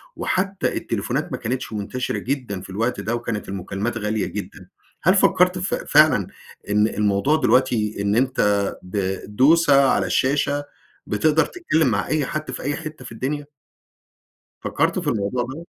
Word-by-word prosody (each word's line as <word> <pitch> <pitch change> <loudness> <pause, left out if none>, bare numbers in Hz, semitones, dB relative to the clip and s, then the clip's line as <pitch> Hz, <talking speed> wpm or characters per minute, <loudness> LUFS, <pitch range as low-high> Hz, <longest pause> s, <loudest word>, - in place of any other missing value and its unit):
وحتى 195 +1 -1
التليفونات - - -2
ما - - -2
كانتش 125 0 -4
منتشرة 110 +5 -3
جدًا 125 -8 -3
في - - -12
الوقت 115 +5 -1
ده، 110 +4 -1
وكانت 115 -4 -4
المكالمات 100 +4 -3
غالية 105 -1 -1
جدًا. - - -7 0.4
هل 185 +4 +5
فكرت 180 -1 +4
ف 185 - -2
فعلًا 150 - +4 0.4
إن 105 +1 +3
الموضوع 105 +7 +1
دلوقتي، 125 -7 +2
إن 100 +1 +1
أنت 130 +2 +1 0.4
بدوسة 115 - +3
على - - +1
الشاشة، 145 +1 +1 0.4
بتقدر 155 +9 +2
تتكلم 165 - 0
مع 105 -4 0
أي 150 0 0
حد 155 0 -4
في - - -6
أي 145 +1 -1
حتة 155 -5 -8
في - - -9
الدنيا؟ 140 +5 -3 1.1
فكرت - - 0
في - - -4
الموضوع 110 +3 -1
دوّة؟ 140 +7 -8
125 Hz, 150 wpm, -22 LUFS, 105-150 Hz, 1.1 s, هل